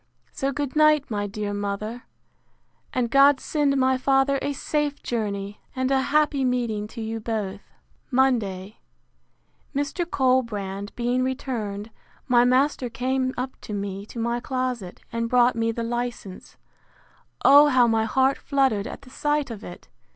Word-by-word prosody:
So 275 +1 -2
good 285 0 -3
night, 305 -3 +4
my 205 -1 -1
dear 205 0 -4
mother: 205 +4 -4 0.9
And 240 -3 -1
God 275 0 +6
send 290 -3 0
my 260 0 +2
father 270 +1 +2
a 285 - -1
safe 295 +1 -2
journey, 205 -3 -3
and 260 0 0
a 265 -1 +3
happy 285 0 +2
meeting 235 -5 -1
to 225 +2 -8
you 225 +1 -3
both! 210 -3 -3 0.5
Monday. 225 -7 0 1.0
Mr. 290 +5 -2
Colbrand 215 - 0
being 245 +1 0
returned, 230 -5 -3 0.4
my 240 -2 +5
master 255 0 +2
came 255 +2 -1
up 255 +1 -3
to 210 - -7
me 200 0 -5
to - - -11
my 235 +1 -1
closet, 250 -7 -3
and 230 0 -2
brought 245 0 +4
me 230 0 0
the 230 +1 -4
license. 240 -5 -5 0.9
O 290 +2 +8
how 255 -4 +5
my 225 -1 +2
heart 265 +4 +2
fluttered 265 -8 +1
at - - -9
the 255 - -15
sight 295 -2 -1
of 220 -2 -8
it! 175 - -10
245 Hz, 150 wpm, -24 LUFS, 215-270 Hz, 1.0 s, O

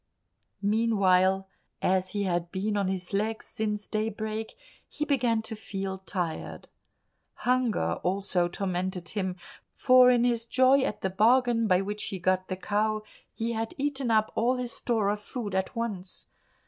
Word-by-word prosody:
Meanwhile, 195 -3 +3 0.3
as 185 0 +1
he 205 +1 -2
had 175 -2 -1
been 205 +3 -1
on 200 -2 +1
his 185 0 -3
legs 220 +2 -1
since 210 -1 -3
daybreak, 220 0 -3 0.3
he 300 - -3
began 240 -6 +1
to 220 - -6
feel 195 -3 -5
tired. 180 -4 -4 0.7
Hunger 250 -2 +1
also 185 -1 0
tormented 180 -1 -3
him, 190 -3 -2 0.4
for 255 -1 +6
in 245 -1 +4
his 235 -2 +1
joy 260 +3 +4
at 210 -5 -2
the 190 - -1
bargain 230 +2 +3
by 185 -1 +4
which 205 +2 -4
he 195 - -4
got 185 +1 +1
the 185 - -3
cow 215 +2 0 0.3
he 230 +1 -3
had 225 +8 -3
eaten 275 -3 -1
up 215 -1 +3
all 245 +3 +2
his 250 -1 -3
store 225 -5 0
of 205 0 -1
food 210 -1 -5
at 190 +5 -1
once. 205 -6 -4
210 Hz, 155 wpm, -28 LUFS, 190-230 Hz, 0.7 s, for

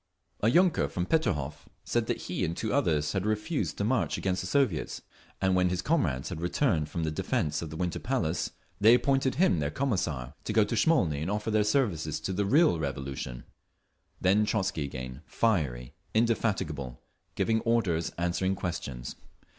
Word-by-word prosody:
'" 85 0 -36
A 105 - +3
yunker 175 +5 +3
from 90 - -2
Peterhof 75 - -1 0.2
said - - 0
that - - -2
he - - -3
and 85 - -2
two 110 - -2
others 80 - +2
had 95 +1 -1
refused 110 +9 -1
to - - -1
march 115 +3 +1
against 95 -1 -1
the 95 - -5
Soviets; 105 - 0 0.4
and 95 -1 +2
when 90 0 +3
his 90 0 -2
comrades 80 - 0
had 85 -4 -5
returned 85 - +1
from 85 - -3
the 80 - -1
defence 75 -1 -1
of 80 - -5
the 80 - -7
Winter 90 +1 -2
Palace 90 -11 -1 0.3
they 110 +4 +7
appointed 135 0 +1
him 155 - +3
their 70 -1 0
Commissar, 80 - -2
to 110 - -3
go 110 -1 +5
to 105 +3 -2
Smolny 100 - +2
and 80 - -2
offer 105 +2 -1
their 105 0 +3
services 100 - 0
to 95 - -2
the 100 +1 0
real 145 - +4
Revolution…. 65 -3 -4 0.8
Then 100 +3 +4
Trotzky 95 -7 0
again, 65 0 -7
fiery, 70 - 0 0.2
indefatigable, 95 - 0 0.4
giving 110 0 +2
orders, 100 -9 +1
answering 90 +2 0
questions. 70 -9 -5
90 Hz, 175 wpm, -29 LUFS, 75-110 Hz, 0.8 s, they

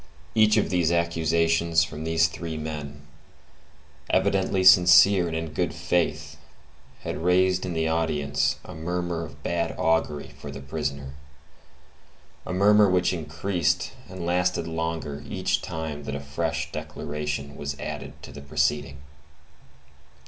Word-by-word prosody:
Each 110 -1 +4
of 105 - +1
these 85 -3 +2
affirmations 85 0 +2
from 75 0 -6
these 80 0 +3
three 80 -1 -6
men, 75 -2 -6 1.1
evidently 95 -1 +2
sincere 90 0 +7
and 80 -1 -3
in 80 -1 -5
good 90 +2 -1
faith, 75 -4 -1 0.6
had - - -4
raised 95 +1 +3
in 90 - -3
the 80 -1 0
audience 75 -3 0
a 90 - -9
murmur 85 +1 -3
of 75 -2 -11
bad 85 -1 -1
augury 80 -2 0
for 70 - -8
the 70 -1 -7
prisoner,—a 70 -1 -4 1.4
murmur 100 +2 +5
which 90 0 +2
increased 85 +1 -1 0.2
and 95 -2 -6
lasted 90 -1 0
longer 80 -3 -3
each - - 0
time 80 -3 -5
that 70 - -4
a - - -3
fresh 75 +1 -3
declaration 75 -1 -5
was 70 -1 -5
added - - -6
to - - -9
the 70 - -10
proceeding. 70 -1 -1
80 Hz, 130 wpm, -25 LUFS, 75-90 Hz, 1.4 s, sincere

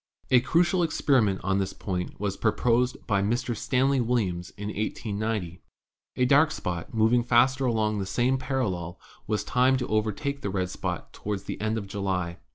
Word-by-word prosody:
"A 125 - +7
crucial 175 +7 +2
experiment 135 - +2
on 95 +1 +1
this 95 0 -2
point 90 -3 -4
was 100 -1 -2
proposed 120 +3 +1
by 100 -3 +1
Mr. 120 +4 -1
Stanley 130 +4 +1
Williams 100 -8 -1
in 105 0 -4
1890. 105 -4 -3 0.5
A 125 - +2
dark 145 +4 +5
spot 90 - -4
moving 115 +2 +3
faster 130 +3 +3
along 110 -3 +1
the 95 - -3
same 125 +6 +1
parallel 95 -11 -2 0.3
was 105 -1 0
timed 130 +1 +3
to 125 - -3
overtake 110 +7 -1
the 100 - -2
red 95 -1 -2
spot - - -4
toward 105 -2 -4
the - - -6
end 110 +1 0
of 105 - -4
July. 95 -3 -2
110 Hz, 165 wpm, -27 LUFS, 95-125 Hz, 0.5 s, A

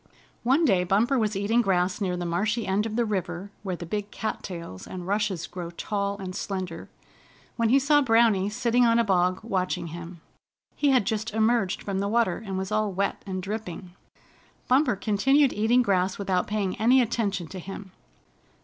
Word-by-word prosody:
One 270 +7 +3
day 190 -9 +3
Bumper 225 +9 +2
was 215 -2 0
eating 210 +5 +2
grass 185 -2 0
near 180 -2 -1
the 175 - -3
marshy 210 +7 0
end 200 +3 0
of 220 - -5
the 235 0 +2
river, 190 -2 -3
where 190 -3 -3
the 175 - -7
big 205 +4 -3
cattails 170 - -6
and 180 -1 -7
rushes 200 -3 -1
grow 175 -2 -7
tall 200 +3 -3
and 190 -2 -6
slender, 185 -5 -5 0.7
when 230 -1 +1
he 265 - +6
saw 290 +2 +4
Browny 225 -6 +3
sitting 245 +2 +2
on 230 -1 +4
a 235 - +4
bog 185 -3 +1
watching 185 -5 -2
him. 170 0 -8 0.6
He 290 - +2
had 255 -6 +3
just 220 +1 -2
emerged 220 -3 +1
from 195 -1 -2
the 200 - -1
water, 225 -3 +1
and 195 -3 -4
was 190 +1 -4
all 215 -1 +1
wet 195 +2 -1
and 185 -1 -4
dripping. 190 -3 -6 0.7
Bumper 255 -2 +3
continued 260 +8 +3
eating 230 +4 +3
grass 185 -3 +1
without 190 -3 0
paying 205 -3 -1
any 245 +4 +5
attention 210 -6 0
to 190 - -7
him. 195 +1 -8
200 Hz, 180 wpm, -26 LUFS, 185-230 Hz, 0.7 s, he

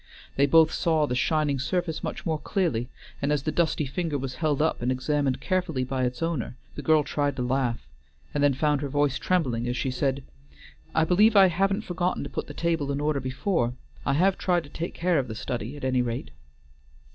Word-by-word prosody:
They 140 +1 +4
both 160 +2 +6
saw 160 -3 +2
the 125 - -2
shining 140 +2 +1
surface 165 +3 -2
much - - -5
more 160 -2 0
clearly, 140 - -1 0.3
and 140 - +1
as 145 -2 +1
the 155 - -1
dusty 160 -1 +1
finger 155 +2 -2
was 130 -1 -4
held 150 -3 +1
up 155 -3 +1
and 125 +1 +1
examined 130 +1 0
carefully 180 -8 -1
by 130 0 -1
its 125 +6 -3
owner, 135 -7 -2 0.2
the - - -6
girl 155 0 +4
tried 145 -1 -1
to 125 - -2
laugh, 125 - -1 0.5
and 145 - 0
then 145 -2 +4
found 145 0 +1
her 145 - -3
voice 145 -1 +1
trembling 130 -10 0
as 125 +1 -1
she 130 - -1
said: 135 +1 -1 0.7
"I 160 - +4
believe 210 +7 +4
I 195 -2 +8
haven't 195 +4 +1
forgotten 180 -2 -2
to - - -7
put - - -4
the - - -9
table 165 -4 0
in 140 - -2
order 150 -1 0
before. 130 - -1 0.3
I 135 - +1
have 185 +6 +2
tried 175 -2 +1
to 145 - -13
take 170 +3 -5
care 175 -2 +2
of 130 - -2
the 110 - -6
study 120 +4 -4
at 145 - -11
any 130 -1 +2
rate." 115 - -3
145 Hz, 215 wpm, -26 LUFS, 130-165 Hz, 0.7 s, I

